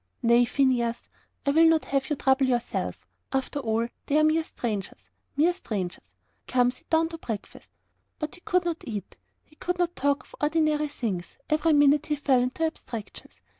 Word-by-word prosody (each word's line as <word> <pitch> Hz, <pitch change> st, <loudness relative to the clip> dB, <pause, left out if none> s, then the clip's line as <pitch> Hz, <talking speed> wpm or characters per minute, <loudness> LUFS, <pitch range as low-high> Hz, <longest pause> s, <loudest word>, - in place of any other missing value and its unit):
"Nay, 235 Hz, +1 st, +5 dB
Phineas, 240 Hz, -2 st, +1 dB, 0.4 s
I 280 Hz, -, +3 dB
will 325 Hz, +3 st, +6 dB
not 325 Hz, -1 st, +3 dB
have 270 Hz, -1 st, -1 dB
you 300 Hz, -, +1 dB
trouble 265 Hz, 0 st, +3 dB
yourself. 240 Hz, -2 st, -2 dB, 0.3 s
And 270 Hz, -, +2 dB
after 285 Hz, -, -5 dB
all, 230 Hz, -2 st, 0 dB, 0.2 s
they 290 Hz, -, +2 dB
are 310 Hz, -, +5 dB
mere 315 Hz, +1 st, +3 dB
strangers 215 Hz, -10 st, -5 dB, 0.3 s
mere 330 Hz, +5 st, +4 dB
strangers. 185 Hz, -, -5 dB, 0.4 s
Come, 245 Hz, -1 st, +3 dB
sit -, -, -19 dB
down 325 Hz, 0 st, +3 dB
to 330 Hz, -1 st, -8 dB
breakfast." 220 Hz, -7 st, -7 dB, 0.5 s
But 305 Hz, -1 st, -4 dB
he 355 Hz, -, -14 dB
could 360 Hz, 0 st, +1 dB
not 335 Hz, -2 st, -2 dB
eat. 210 Hz, -5 st, -5 dB, 0.3 s
He 305 Hz, -, -25 dB
could 360 Hz, +1 st, -2 dB
not 350 Hz, -1 st, 0 dB
talk 285 Hz, +1 st, +1 dB
of -, -, -22 dB
ordinary 300 Hz, 0 st, +2 dB
things. 215 Hz, -11 st, -4 dB
Every 310 Hz, +1 st, +3 dB
minute 290 Hz, 0 st, +5 dB
he 300 Hz, -, +1 dB
fell 275 Hz, -3 st, +3 dB
into 255 Hz, +6 st, 0 dB
abstractions. 215 Hz, -, -7 dB
280 Hz, 180 wpm, -27 LUFS, 235-315 Hz, 0.5 s, will